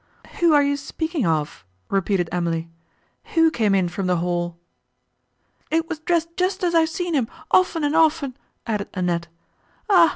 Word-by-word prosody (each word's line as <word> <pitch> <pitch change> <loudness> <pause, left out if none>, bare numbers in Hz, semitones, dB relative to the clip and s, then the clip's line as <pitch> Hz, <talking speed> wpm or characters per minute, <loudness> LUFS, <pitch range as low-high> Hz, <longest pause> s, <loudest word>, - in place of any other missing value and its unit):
"Who 340 -1 +5
are 290 -1 +6
you 285 0 +1
speaking 310 - -2
of?" 155 - -1 0.2
repeated 195 -2 0
Emily, 165 -1 -2 0.6
"Who 325 -1 +5
came 215 -8 +2
in 185 -2 +2
from 185 +2 -3
the 180 - +2
hall?" 175 0 -2 1.1
"It 325 0 +1
was 325 -3 -4
dressed 335 0 -1
just 370 +1 -1
as 345 -1 +1
I 335 - +6
have 320 0 +2
seen 345 +1 -3
him, 260 -7 +1 0.2
often 355 -3 +3
and 290 +1 +1
often," 310 -5 +2 0.3
added 210 -3 -2
Annette. 175 -2 -1 0.6
"Ah! 345 -4 +7
280 Hz, 165 wpm, -22 LUFS, -, 1.1 s, Ah